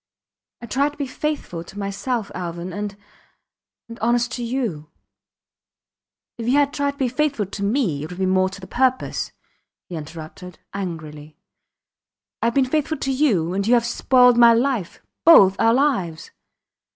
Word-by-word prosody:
I - - -4
tried 280 +5 0
to - - -19
be 285 - -2
faithful 265 - -4
to 190 - -13
myself 205 +3 -3
Alvan 175 0 -5
and... 205 +1 -5 0.9
and 230 0 -10
honest 240 +1 +1
to 245 -1 -4
you.... 230 - -3 1.5
If 230 - -4
you 250 - +2
had 285 -1 +2
tried 285 -1 -1
to - - -24
be 265 - +1
faithful 260 -3 0
to 200 +2 -8
me 200 - 0
it - - -6
would - - -9
have - - -11
been 185 -1 +1
more 185 0 +3
to 195 +1 -10
the 190 - -10
purpose, 255 +6 0 0.5
he 180 - -8
interrupted, 160 +3 -9 0.2
angrily. 155 -6 -7 1.0
Ive 230 0 0
been 270 -1 +4
faithful 305 +3 -1
to 270 0 -2
you 215 - +1
and 200 +2 -1
you 245 - +5
have 235 -1 +2
spoiled 250 0 +4
my 235 -1 +8
life 240 -7 -1 0.2
both 195 - +8
our 230 +1 +4
lives 235 - 0
230 Hz, 165 wpm, -22 LUFS, 185-260 Hz, 1.5 s, my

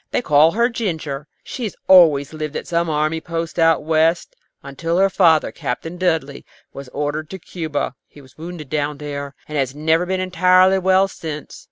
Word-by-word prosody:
They - - -1
call 150 0 +4
her 235 +3 +3
Ginger. 160 - -4 0.2
She 250 - -5
had 210 - -5
always 160 -7 +5
lived 155 -1 -5
at - - -4
some 170 0 -1
army 155 +1 0
post 165 0 -4
out 165 -2 +3
West, 160 +2 +1 0.3
until 165 +5 -3
her 195 +1 +3
father, 165 -5 +3
Captain 165 +8 -5
Dudley, 160 -6 -1 0.3
was 140 -1 -9
ordered 150 +3 -3
to 190 - -7
Cuba. 160 -6 -4
He - - -17
was 130 -2 -18
wounded 160 -3 -9
down 150 -1 -1
there, 140 -1 -6
and 150 -1 -3
has 135 0 -2
never 160 +3 +1
been 190 0 -1
entirely 185 +1 +3
well 190 +1 +3
since. 155 -6 -8
160 Hz, 180 wpm, -20 LUFS, 150-180 Hz, 0.3 s, always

